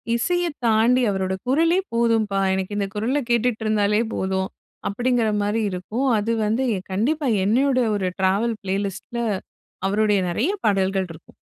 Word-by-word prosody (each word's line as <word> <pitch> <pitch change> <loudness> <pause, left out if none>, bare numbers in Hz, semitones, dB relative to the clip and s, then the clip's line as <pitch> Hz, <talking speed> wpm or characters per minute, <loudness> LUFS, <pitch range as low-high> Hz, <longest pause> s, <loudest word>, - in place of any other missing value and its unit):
இசையத் 345 +4 0
தாண்டி 230 +3 +4
அவரோட 190 -1 -1
குரலே 330 +7 +3
போதும்பா. 225 -4 +2
எனக்கு 190 +2 -2
இந்த 200 -1 0
குரல 240 +7 0
கேட்டுட்டு 235 -1 +1
இருந்தாலே 210 0 +2
போதும், 190 0 -1 0.4
அப்டிங்கிற 240 +1 +1
மாரி 210 +2 0
இருக்கும். 215 +9 -2
அது 215 +2 -1
வந்து 225 +5 +1 0.3
கண்டிப்பா 275 +9 0 0.2
என்னையோட 255 +4 +3 0.2
ஒரு 190 -2 -1
ட்ராவல் 200 +5 +1
ப்ளேலிஸ்ட்டில 200 +4 -3 0.7
அவருடைய 205 -1 +2
நெறைய 250 - 0
பாடல்கள் 195 -2 +1
இருக்கும். 160 - -14
215 Hz, 130 wpm, -23 LUFS, 195-245 Hz, 0.7 s, தாண்டி